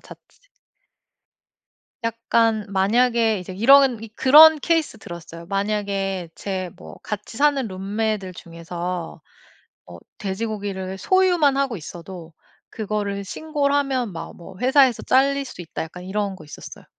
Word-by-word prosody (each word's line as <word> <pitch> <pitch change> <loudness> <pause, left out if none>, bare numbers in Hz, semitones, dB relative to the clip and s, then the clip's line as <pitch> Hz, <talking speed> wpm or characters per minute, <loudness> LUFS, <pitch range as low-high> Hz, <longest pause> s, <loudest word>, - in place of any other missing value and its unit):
자체 - - -14 1.8
약간 230 -1 +1
만약에 225 +3 +2
이제 180 0 -8
이런 255 +2 +5
이 225 - -8
그런 310 +4 +8
케이스 325 -7 0
들었어요. 170 -2 -10
만약에 195 -2 -2
제 190 -2 -4
뭐 80 0 -12
같이 210 +1 -6
사는 280 -2 +2
룸메들 200 +1 -3
중에서 170 0 -6 0.7
어 85 -1 -11 0.2
돼지고기를 195 -2 -4
소유만 350 - +3
하고 275 -4 0
있어도 170 0 -10 0.4
그거를 205 -2 -3
신고를 285 - -1
하면 260 -7 -1
막 165 - -7
뭐 180 +2 -12
회사에서 260 -1 +4
짤릴 275 +1 +2
수 250 - -10
있다 165 - -6
약간 180 +3 -9
이런 200 0 -2
거 155 - -13
있었어요. 150 - -11
210 Hz, 275 characters per minute, -22 LUFS, 185-260 Hz, 1.8 s, 그런